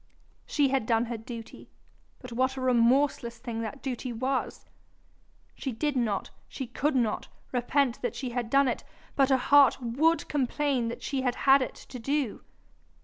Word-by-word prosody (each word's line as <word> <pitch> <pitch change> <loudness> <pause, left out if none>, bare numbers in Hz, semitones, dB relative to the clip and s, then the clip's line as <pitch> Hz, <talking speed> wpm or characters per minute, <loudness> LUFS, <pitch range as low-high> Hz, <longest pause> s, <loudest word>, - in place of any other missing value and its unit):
She 285 -2 +2
had 260 -4 0
done 230 0 +2
her 235 0 -4
duty, 225 0 -9 0.5
but 250 - -11
what 260 +2 0
a - - -3
remorseless 245 0 +2
thing 230 -1 -5
that 230 +5 -6
duty 255 -1 -3
was! 255 +3 -2 0.9
She 265 - -4
did 285 +5 -1
not, 220 -6 -1 0.2
she 265 - -5
could 270 +4 -1
not, 235 -4 0 0.2
repent 255 0 +1
that 245 - -2
she 255 -3 -4
had 240 -2 -3
done 275 +2 +4
it, 245 - -2 0.3
but 270 -1 +3
her 265 - +5
heart 280 0 +5
WOULD 275 +8 +1
complain 275 -2 0
that 230 - -6
she 270 -1 -1
had 250 -2 0
had 270 0 +7
it 255 - -3
to 250 - -10
do. 275 0 -1
255 Hz, 170 wpm, -28 LUFS, 235-275 Hz, 0.9 s, had